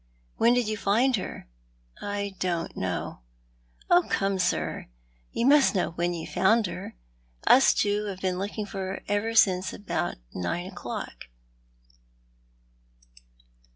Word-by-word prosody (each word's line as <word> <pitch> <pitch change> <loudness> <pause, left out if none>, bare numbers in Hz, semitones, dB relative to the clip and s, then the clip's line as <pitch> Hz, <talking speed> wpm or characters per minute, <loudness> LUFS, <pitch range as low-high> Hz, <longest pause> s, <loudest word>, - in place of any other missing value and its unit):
"When 235 +2 +4
did 245 -3 +1
you 215 0 -2
find 235 +7 +3
her?" 185 - -6 0.3
" - - -38 0.2
I 200 -1 -3
don't 175 -2 -2
know." - - -3 0.7
"Oh, 350 0 +5
come, 195 -1 0
sir, 180 0 -1 0.4
you 235 - -1
must 280 -4 +5
know 180 - +1
when 175 +1 -1
you 165 - -5
found 220 +3 +3
her. 175 - -6 0.5
Us 265 +2 +7
two 205 0 +1
have 195 -3 -5
been 185 -1 -1
looking 205 +2 -3
for 200 -1 -7
her 190 0 -4
ever 210 +3 0
since 190 -4 +4 0.6
nine 90 - -2
o'clock. 175 -10 -7
200 Hz, 130 wpm, -27 LUFS, 180-220 Hz, 0.7 s, Us